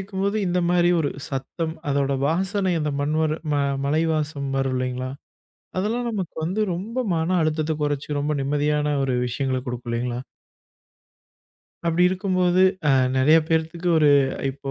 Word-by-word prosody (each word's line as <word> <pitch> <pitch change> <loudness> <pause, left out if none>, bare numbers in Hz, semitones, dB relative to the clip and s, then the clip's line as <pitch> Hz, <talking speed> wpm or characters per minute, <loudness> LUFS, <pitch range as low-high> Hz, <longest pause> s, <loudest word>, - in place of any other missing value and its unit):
இருக்கும்போது, 195 +2 -2
இந்த 180 0 +1
மாரி 175 0 +4
ஒரு 150 - +1 0.2
சத்தம், 145 +4 -3 0.2
அதோட 140 -1 +1
வாசனை, 190 +3 0
அந்த 150 -1 -1
மண் 145 +2 0
வர 155 0 0
ம - - +2 0.3
மழை 155 +3 +2
வாசம் 145 -2 -2
வரும் 135 -1 0
இல்லைங்களா? 125 0 -2 0.7
அதெல்லாம் 235 +5 -1
நமக்கு 195 -6 -4
வந்து 185 +6 -1
ரொம்ப 220 +8 -5 0.2
மன 165 +3 +1
அழுத்தத்த 155 0 0
கொறச்சு, 145 -1 -1
ரொம்ப 145 +1 0
நிம்மதியான 150 +1 +1
ஒரு 130 - 0
விஷயங்கள 130 +1 -1
குடுக்கும் 125 -1 -5
இல்லைங்களா? 120 +1 -2 1.7
அப்டி 170 +1 +2
இருக்கும்போது 185 -1 +2 0.3
அ - - +5 0.3
நெறைய 150 +5 +6
பேர்த்துக்கு 165 +2 -1
ஒரு 150 - +5 0.4
இப்போ 135 0 -7
155 Hz, 145 wpm, -23 LUFS, 140-180 Hz, 1.7 s, நெறைய